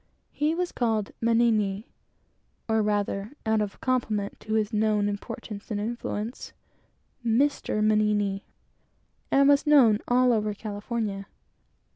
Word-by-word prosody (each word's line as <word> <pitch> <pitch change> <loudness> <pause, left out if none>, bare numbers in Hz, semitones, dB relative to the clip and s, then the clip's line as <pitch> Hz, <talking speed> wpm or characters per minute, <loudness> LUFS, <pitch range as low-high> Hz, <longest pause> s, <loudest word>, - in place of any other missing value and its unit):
He 305 +2 0
was 355 0 -2
called 220 -4 -1
Mannini, 225 -3 +2 0.8
or 220 -1 +2
rather, 205 +1 -1
out 220 -1 +2
of 205 -2 -4
compliment 220 -6 -1
to 215 - -5
his 215 0 0
known 210 -1 +2
importance 205 0 -6
and 210 -2 -2
influence, 230 +1 -4 0.7
Mr. 235 -2 +1
Mannini 210 -2 +1 0.9
and 275 0 +4
was 285 +1 +4
known 245 -8 +6
all 250 0 +4
over 210 -2 0
California. 205 -1 -4
215 Hz, 115 wpm, -26 LUFS, 205-240 Hz, 0.9 s, known